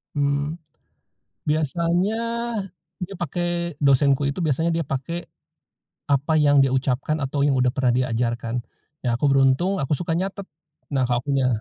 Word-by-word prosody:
Mmm. 145 +2 0 0.9
biasanya 170 +7 +1 0.8
dia 180 +2 -6
pake 175 -2 -2
dosenku 140 0 +3
itu 140 +6 -2
biasanya 160 +2 +1
dia 165 - 0
pake, 145 +4 -4 0.8
apa 140 +3 +2
yang 145 -1 +5
dia 135 - +2
ucapkan 135 +4 0
atau 140 +1 0
yang 140 - +3
udah 130 -1 +3
pernah 125 -1 +1
diajarkan. 120 -1 -1 0.5
Ya 120 - +2
aku 140 +4 +2
beruntung 135 +8 +3
aku 140 -1 0
suka 165 +2 -2
nyatet. 195 +1 -4 0.4
Nah, 135 -2 +1
kalo 120 -1 0
akunya 135 -1 +1
140 Hz, 140 wpm, -23 LUFS, 130-170 Hz, 0.9 s, yang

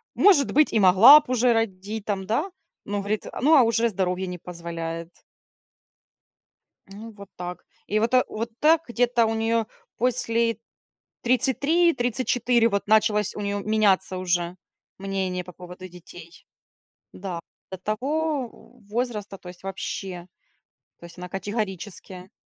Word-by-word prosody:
может 370 -9 +4
быть 305 +2 +3
и 220 - +3
могла 200 +10 +9
б 300 - -13
уже 250 0 +3
родить 210 -1 -3
там", 195 -2 -2
да, 290 - -1 0.3
ну 205 0 -2
говорит, 205 +2 -3
"А, - - -7
ну, 305 +5 +5
а, 270 - +7
уже 230 0 +2
здоровье 190 -2 -2
не 180 0 -5
позволяет". 165 -1 -6 1.8
Ну 210 +4 -10
вот 200 -2 -13
так. 180 0 -7 0.2
И 215 - +1
вот 230 +3 0
вот 230 +2 -4
так 315 +1 +4
где-то 240 -1 +2
у 225 - -1
неё 225 0 0 0.3
после 230 -1 0 0.7
33-34 250 -3 +2
вот 200 -2 -2
началось 210 -1 +2
у - - -6
неё 200 0 -2
меняться 200 -3 +1
уже 175 -1 -1 0.4
мнение 190 -2 -3
по 180 - -11
поводу 180 +1 -11
детей. 175 -1 -14 0.7
Да, 180 -3 -6 0.3
до 190 - -6
того 275 - -2 0.4
возраста, 210 -3 -3
то 180 - -12
есть 180 -1 -12
вообще, 190 -1 -6 0.7
то - - -16
есть 170 +1 -15
она 180 0 -7
категорически 190 -1 -5
210 Hz, 135 wpm, -24 LUFS, 185-235 Hz, 1.8 s, могла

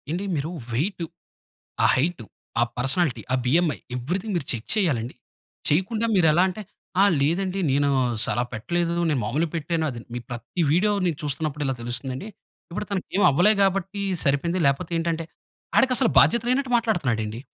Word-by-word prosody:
ఏండి 175 +6 -2
మీరు 150 +3 -2 0.2
వెయిట్, 170 - -1 0.8
ఆ - - +7
హైట్, 155 0 0 0.4
ఆ - - +4 0.2
పర్సనాలిటీ, 135 +3 +1
ఆ - - +3
బీఎంఐ. 160 +3 +2 0.2
ఎవ్రీథింగ్ 180 - -3
మీరు 155 -6 -2
చెక్ 115 -3 -6
చేయాలండి. 130 - 0 0.5
చేయకుండా 205 +9 +1
మీరెలా 170 -2 +4
అంటే, 190 +3 -6 0.4
"ఆ! - - +7 0.2
లేదండి. 180 +6 0
నేను 140 +1 +2 0.4
సల - - 0
పెట్టలేదు. 170 +9 -1
నేను 145 -5 +1
మామూలుగా 155 +9 -1
పెట్టాను." 160 +1 -1 0.3
"మీ 120 - -3
ప్రతి 120 +8 -3
వీడియో 200 +6 +3
నేను 165 -4 -1
చూస్తున్నప్పుడెలా 145 -1 -2
తెలుస్తుందండి. 130 - -3 0.4
ఇప్పుడు 180 +4 -4
తనకు 195 -3 -2
ఏం 200 - +3
అవ్వలే 175 +10 +5
గాబట్టి 195 +1 0 0.2
సరిపోయింది 155 +6 +1
లేపోతేంటంటే" 165 +3 0 0.5
ఆడికసలు 255 -2 +4
బాధ్యత 235 - +4
లేనట్టు 255 0 +1
మాట్లాడుతున్నాడండి. 125 - -1
165 Hz, 140 wpm, -24 LUFS, 135-190 Hz, 0.8 s, ఆ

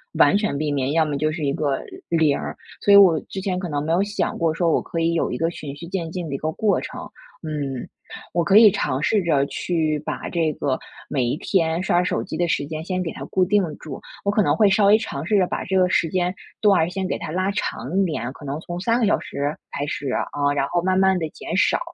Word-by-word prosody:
完 - - +5
全 210 -9 -1
避 150 +1 -1
免， 140 -2 0
要 160 +1 +3
么 145 -2 -2
就 155 +2 0
是 155 -1 -3
一 140 - +1
个 145 -4 -1 0.3
0， 160 -4 +3 0.4
所 205 - +4
以 - - +10
我 185 -5 +7
之 195 - -7
前 190 -1 -2
可 180 -1 -4
能 145 -1 -1
没 160 - +1
有 180 +3 +3
想 205 +1 -2
过 165 -2 +1
说 170 +1 +1
我 - - +2
可 165 - -5
以 165 0 +1
有 165 - 0
一 - - -2
个 165 - +1
循 150 -4 -7
序 170 - -9
渐 170 -3 -3
进 175 -1 -4
的 140 - -3
一 - - -1
个 155 +3 -2
过 200 +4 +1
程。 - - -7 0.3
嗯， 145 -5 -4 0.5
我 170 - +2
可 195 +4 +5
以 220 -1 +9
尝 135 -8 -1
试 205 +5 +2
着 145 -5 +2
去 155 0 -1
把 145 - -5
这 165 -3 0
个 130 -2 -1 0.3
每 135 -3 0
一 120 +4 -1
天 165 -2 0
刷 175 -1 +2
手 180 - -1
机 - - -6
的 175 -1 0
时 145 - 0
间 155 +1 -5
先 185 +1 -2
给 165 -3 -3
它 - - -7
固 185 -1 +2
定 205 +2 +3
住， 145 -5 -8 0.2
我 200 - +3
可 210 0 +2
能 145 - +2
会 210 - +5
稍 200 +1 +4
微 210 +2 +7
尝 140 -9 -5
试 210 +4 +2
着 185 -2 +3
把 - - -3
这 190 - 0
个 180 - +4
时 165 -3 +2
间 180 +2 0 0.2
段 205 -3 +4
儿 160 - +1
先 190 +1 -3
给 - - -2
它 155 - -6
拉 185 +3 0
长 185 -4 -3
一 195 - +4
点， 130 -8 -3
可 145 - -14
能 145 +1 -4
从 175 +1 -6
3 230 +4 +2
个 235 - +2
小 205 - +3
时 145 +2 -3 0.2
开 145 - -3
始， 145 -2 -3
啊， 145 +2 0
然 140 -1 0
后 175 +3 0
慢 185 +1 +1
慢 190 -1 +4
地 160 -3 -2
减 165 - -6
少。 190 - +3
170 Hz, 280 characters per minute, -22 LUFS, 150-190 Hz, 0.5 s, 以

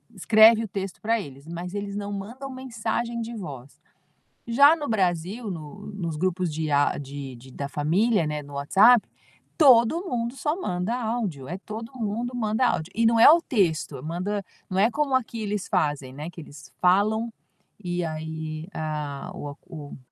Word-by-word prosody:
escreve 220 +3 +6
o - - -4
texto 195 -1 -5
pra 225 0 +1
eles, 140 -1 -11
mas 175 +3 -6
eles 200 0 -4
não 205 0 -4
mandam 235 +8 -6
mensagem 235 -2 -3
de 230 +1 -5
voz. 140 - -8 0.7
Já 285 +7 +7
no 295 - -4
Brasil, 195 +2 -1
no 165 +4 -8
nos 170 -5 -3
grupos 180 0 -1
de 155 -1 -2
a 145 0 +3
de 140 -2 -7
de 130 +2 -14
da 140 +2 -5
família, 170 +8 +2
não 150 - -2
é, 150 - -3
no 145 0 -12
WhatsApp, 200 +12 +5 0.5
todo 275 - +5
mundo 240 -5 -2
só 300 +3 0
manda 180 - -1
áudio, 220 - -3
é 180 - -4
todo 220 +4 -8
mundo 230 +3 -2
manda 220 +1 +1
áudio. 160 +2 -1
E 230 - +2
não 230 0 +4
é 230 - +10
o 335 +3 +7
texto, 175 - 0
manda 180 +6 -2 0.3
não 185 - 0
é 215 +4 +5
como 285 0 0
aqui 230 -3 -1
eles 210 -2 -2
fazem, 145 -7 0
né, 150 +4 -6
que 175 - -12
eles 145 -3 -13
falam 205 +5 +3 0.6
e 175 -1 -1
aí, 160 0 -5
a 150 +1 -4
o 145 -5 -6
a - - -7
o 150 -5 -9
195 Hz, 180 wpm, -25 LUFS, 155-230 Hz, 0.7 s, é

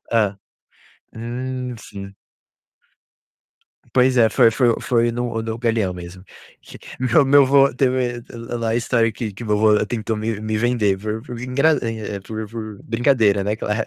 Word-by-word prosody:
Hã. 105 -4 +1 0.8
Hum, 125 +2 -5
sim. 100 -3 -10 1.8
Pois 130 0 +3
é, 115 -2 +6
foi 115 - +4
foi 120 0 +2
foi 120 -1 +1
no 120 -1 -3
no 110 0 -4
Galeão 115 -5 0
mesmo. 90 +1 -10 0.4
Que - - -13 0.2
meu 130 +3 +4
meu 140 +1 +6
avô 135 0 +4
teve 125 -2 0
lá 115 0 -6
lá 115 -1 -2
a 110 - 0
história 115 -1 +1
que 110 -2 -5
que 100 - -9
meu 105 0 +1
avô 105 0 +3
tentou 110 -2 -3
me 110 -1 -3
me 110 0 -2
vender 110 -4 +1
por 110 +1 -4
por 120 -3 -8
engra 140 +5 +2
é, 110 -3 -4
por 110 +2 -6
por 110 -3 -7
brincadeira, 115 -4 +2
né, 105 +2 -1
claro. 110 +1 -2
115 Hz, 165 wpm, -21 LUFS, 110-125 Hz, 1.8 s, é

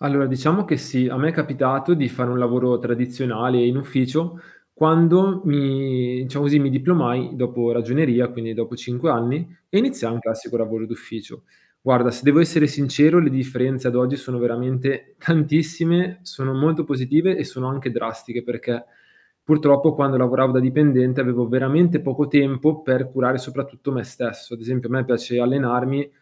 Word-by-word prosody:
Allora 140 -1 +1
diciamo 155 +10 +1
che 155 -6 0
sì, 125 -3 -1
a 130 - -5
me 150 +5 +1
è - - -5
capitato 140 -1 0
di 140 -6 0
fare 125 0 -3
un 125 - -1
lavoro 125 0 +1
tradizionale 125 0 -1
in 125 +2 +1
ufficio 140 +5 -2 0.3
quando 170 +4 +4
mi 135 -3 -1
diciamo 140 +2 -2
così, 145 +1 +4
mi 140 -1 +1
diplomai 135 -3 0
dopo 120 -2 -1
ragioneria, 125 +1 +1
quindi 115 -2 -7
dopo 115 +1 -5
5 125 +6 -2
anni 130 +5 -1 0.2
e 195 - +1
iniziai 215 - -1
un 120 - -4
classico 110 +1 -4
lavoro 115 -1 -3
d'ufficio. 115 -1 -11 0.4
Guarda, 125 -2 +2
se 125 - -7
devo 145 +2 +6
essere 165 -2 +4
sincero 145 +3 +3
le 160 -4 +4
differenze 130 -1 -2
ad 125 - -1
oggi 125 +2 +1
sono 130 -3 -6
veramente 125 - -2
tantissime, 165 +3 +1
sono 135 -7 -5
molto 160 +4 +1
positive, 145 +7 +1
e - - -2
sono 130 0 -7
anche 130 0 -4
drastiche 120 0 -6
perché 120 0 -5 0.6
purtroppo 150 0 +4
quando 140 -2 +1
lavoravo 130 +1 +2
da 130 - +3
dipendente, 130 -1 +3
avevo 125 -2 0
veramente 150 +6 +3
poco 140 0 -1
tempo 145 +2 +2
per 130 -2 0
curare 130 0 0
soprattutto 140 +2 -7
me 125 -4 -3
stesso. 120 -1 -7
Ad 115 - -13
esempio, 125 +1 -4
a - - -3
me 130 -1 0
piace 120 0 -1
allenarmi 130 +2 0
130 Hz, 165 wpm, -21 LUFS, 125-150 Hz, 0.6 s, devo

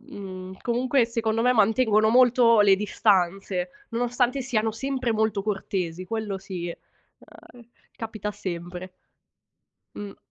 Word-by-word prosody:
mhmm, 190 -7 -9
comunque 245 +1 +2
secondo 230 -1 -1
me 250 +1 +4
mantengono 220 -1 +3
molto 245 -2 +5
le 200 -1 +6
distanze, 190 -3 +1 0.2
nonostante 245 +3 0
siano 225 -3 0
sempre 255 0 -2
molto 215 -2 0
cortesi, 185 -4 -3
quello 215 -3 -3
sì. 180 -3 -6
Ehm, 235 +6 -15 0.3
capita 215 -2 -5
sempre. 180 -1 -6 1.0
Mh. 205 -1 -8
215 Hz, 110 wpm, -25 LUFS, 190-240 Hz, 1.0 s, le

